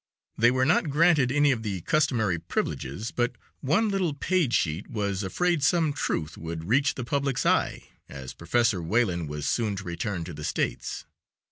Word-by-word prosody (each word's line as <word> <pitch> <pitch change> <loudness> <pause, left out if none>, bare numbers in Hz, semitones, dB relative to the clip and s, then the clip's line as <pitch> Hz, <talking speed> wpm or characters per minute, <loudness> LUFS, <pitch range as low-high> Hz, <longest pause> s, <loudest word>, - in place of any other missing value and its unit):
They 115 +2 +5
were 130 +1 +2
not 160 +1 +2
granted 150 -3 +4
any 145 +1 +4
of 120 -4 -1
the 100 -5 -3
customary 115 - +1
privileges, 85 - -3
but 120 0 -1 0.2
one 180 +11 +2
little 185 -7 0
paid 170 -3 +1
sheet 80 -3 0
was 100 -4 -2
afraid 170 - 0
some 160 +1 +2
truth 80 - -2
would 80 0 -5
reach 140 +6 +2
the 130 - -4
public's 140 0 -1
eye, - - +1 0.3
as 65 -2 -8
Professor 100 +2 +1
Wayland 85 -3 0
was 75 -1 -4
soon 110 -4 0
to - - -6
return 85 +1 -3
to 85 0 -7
the 75 0 -8
States. - - -2
115 Hz, 170 wpm, -27 LUFS, 85-145 Hz, 0.3 s, They